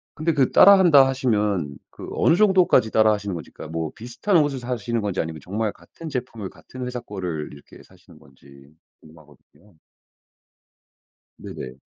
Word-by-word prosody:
근데 165 Hz, +1 st, -1 dB
그 135 Hz, -3 st, +1 dB
따라한다 175 Hz, -9 st, +7 dB
하시면 105 Hz, -, -1 dB
그 -, -, -11 dB
어느 165 Hz, -, +3 dB
정도까지 185 Hz, -, +3 dB
따라하시는 105 Hz, -2 st, +2 dB
건지 85 Hz, -3 st, -8 dB
그니까 80 Hz, -, -10 dB
뭐 80 Hz, -1 st, -3 dB
비슷한 125 Hz, -, -1 dB
옷을 145 Hz, -4 st, +1 dB
사시는건지 115 Hz, -5 st, -3 dB
아니면 80 Hz, -1 st, -4 dB
정말 105 Hz, +3 st, -2 dB
같은 165 Hz, -, -13 dB
제품을 120 Hz, -7 st, -5 dB
같은 130 Hz, -1 st, -10 dB
회사 125 Hz, 0 st, -5 dB
거를 90 Hz, -9 st, -6 dB
이렇게 70 Hz, -, -15 dB
사시는 -, -, -20 dB
건지 70 Hz, +1 st, -19 dB, 0.3 s
궁금하거든요. 80 Hz, +4 st, -21 dB, 1.6 s
네네. 65 Hz, -, -9 dB
110 Hz, 355 characters per minute, -22 LUFS, 80-130 Hz, 1.6 s, 따라한다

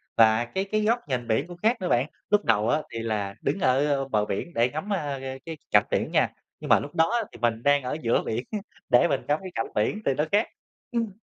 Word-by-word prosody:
và 115 Hz, +1 st, +5 dB
cái 190 Hz, +11 st, -3 dB
cái 215 Hz, +2 st, 0 dB
góc 230 Hz, +3 st, +2 dB
nhìn 125 Hz, -4 st, -2 dB
biển 115 Hz, +8 st, +1 dB
cũng 175 Hz, -1 st, -10 dB
khác 225 Hz, +7 st, +2 dB
nữa 180 Hz, -, -1 dB
bạn. 120 Hz, +4 st, +2 dB, 0.2 s
Lúc 210 Hz, 0 st, +3 dB
đầu 110 Hz, 0 st, +2 dB
á 150 Hz, +4 st, +2 dB
thì 115 Hz, -, -3 dB
là 105 Hz, -3 st, -2 dB
đứng -, -, -1 dB
ở, 135 Hz, -2 st, +3 dB
ơ, 140 Hz, -2 st, +1 dB
bờ 105 Hz, -5 st, +1 dB
biển 105 Hz, -, -4 dB
để 120 Hz, +2 st, +2 dB
ngắm, 155 Hz, +10 st, -3 dB
a, 145 Hz, -7 st, -2 dB, 0.3 s
cái 165 Hz, -1 st, -6 dB
cảnh -, -, +5 dB
biển -, -, 0 dB
nha. -, -, +3 dB, 0.3 s
Nhưng -, -, -7 dB
mà -, -, +6 dB
lúc 145 Hz, +3 st, -8 dB
đó 160 Hz, 0 st, +4 dB
á 235 Hz, -, +1 dB
thì -, -, -12 dB
mình 115 Hz, 0 st, 0 dB
đang 145 Hz, -1 st, +4 dB
ở 130 Hz, +4 st, -3 dB
giữa 115 Hz, -3 st, +2 dB
biển 115 Hz, +3 st, -2 dB
á, 215 Hz, -, -2 dB, 0.3 s
để 125 Hz, +8 st, +5 dB
mình -, -, 0 dB
ngắm 150 Hz, +1 st, +2 dB
cái 190 Hz, -1 st, -7 dB
cảnh 115 Hz, -, -1 dB
biển 110 Hz, -, 0 dB
thì 135 Hz, -, +3 dB
nó 150 Hz, +3 st, 0 dB
khác. 210 Hz, +2 st, +3 dB, 0.4 s
Ừm. 230 Hz, -4 st, -1 dB
145 Hz, 260 wpm, -26 LUFS, 115-185 Hz, 0.4 s, mà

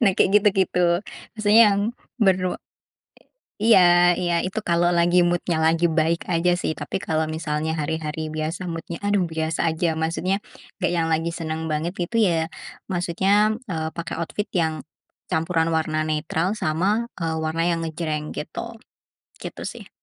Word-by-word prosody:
Nah 200 Hz, -, +5 dB
kayak -, -, +4 dB
gitu-gitu, 180 Hz, -4 st, +2 dB, 0.3 s
maksudnya 215 Hz, 0 st, +5 dB
yang 200 Hz, -, 0 dB, 0.4 s
bernu 185 Hz, -3 st, +3 dB, 1.1 s
i 225 Hz, -, +3 dB
iya, 175 Hz, -3 st, +6 dB
iya 175 Hz, -2 st, 0 dB
itu 185 Hz, +4 st, -3 dB
kalau 175 Hz, 0 st, +3 dB
lagi 175 Hz, +1 st, +4 dB
mood-nya 175 Hz, -1 st, 0 dB
lagi 165 Hz, +2 st, +3 dB
baik 165 Hz, 0 st, 0 dB
aja 175 Hz, 0 st, +2 dB
sih. 155 Hz, -, -2 dB
Tapi 145 Hz, +3 st, -4 dB
kalau 160 Hz, -3 st, -1 dB
misalnya 155 Hz, -1 st, -2 dB
hari-hari 155 Hz, 0 st, -3 dB
biasa 160 Hz, +4 st, -3 dB
mood-nya, 165 Hz, 0 st, -5 dB
aduh 205 Hz, -1 st, +2 dB
biasa 160 Hz, 0 st, -2 dB
aja. 160 Hz, 0 st, 0 dB
Maksudnya, 170 Hz, +5 st, -1 dB, 0.4 s
gak -, -, +2 dB
yang 170 Hz, -2 st, 0 dB
lagi 165 Hz, +1 st, 0 dB
senang 160 Hz, -1 st, -4 dB
banget 160 Hz, +4 st, -2 dB
gitu 185 Hz, +5 st, -2 dB
ya, 165 Hz, -5 st, +2 dB, 0.4 s
maksudnya, 195 Hz, +4 st, +2 dB
mmm, 235 Hz, -3 st, -11 dB
eee, 160 Hz, -1 st, -2 dB
pakai 170 Hz, -, -4 dB
outfit 205 Hz, +5 st, -3 dB
yang 160 Hz, -3 st, 0 dB, 0.5 s
campuran 165 Hz, 0 st, +1 dB
warna 155 Hz, -1 st, 0 dB
netral 160 Hz, +4 st, -1 dB
sama, 195 Hz, +9 st, 0 dB
eee, 165 Hz, -2 st, -1 dB
warna 160 Hz, +1 st, -1 dB
yang 170 Hz, -1 st, +1 dB
ngejreng 155 Hz, -1 st, -3 dB
gitu. 230 Hz, +9 st, -6 dB, 0.7 s
Gitu -, -, -7 dB
sih. -, -, -9 dB
170 Hz, 155 wpm, -23 LUFS, 160-180 Hz, 1.1 s, iya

